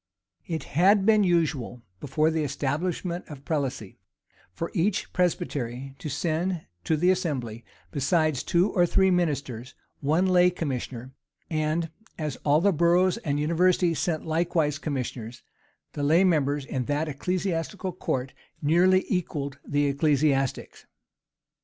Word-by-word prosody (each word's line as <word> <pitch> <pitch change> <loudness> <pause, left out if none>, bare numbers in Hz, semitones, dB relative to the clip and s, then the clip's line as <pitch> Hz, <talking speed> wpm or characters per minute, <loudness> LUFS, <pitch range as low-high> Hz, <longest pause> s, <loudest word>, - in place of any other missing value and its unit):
It 160 -2 -3
had 190 +6 +3
been 215 -1 +5
usual, 155 -9 0 0.2
before 155 +7 +1
the 160 -1 0
establishment 170 +6 -2
of 145 -3 -11
prelacy, 135 - -3 0.5
for 165 - -5
each 185 +2 0
presbytery 135 -7 -2
to 155 - -5
send 165 +4 -1 0.2
to 160 - +1
the 180 +4 +4
assembly, 130 - -2 0.3
besides 155 -1 +1
two 180 +3 +2
or 175 -2 +3
three 190 +2 +3
ministers, 140 -8 -1 0.2
one 155 +6 +2
lay 180 -1 +5
commissioner;[*] 130 -6 -5 0.4
and, 155 +1 -1 0.3
as 150 -5 -3
all 150 +2 +2
the 200 +1 +3
boroughs 175 +4 +3
and 145 -10 -2
universities 170 +2 +2
sent 160 -3 -1
likewise 160 -3 0
commissioners, 125 -5 -5 0.5
the 145 - -4
lay 160 +6 +4
members 145 -5 +1
in 130 -2 -3
that 145 +4 -1
ecclesiastical 180 +4 -2
court 130 -7 -3 0.3
nearly 180 +5 +3
equalled 145 -6 -2
the 145 0 0
ecclesiastics. 140 -2 0
155 Hz, 130 wpm, -26 LUFS, 140-175 Hz, 0.5 s, been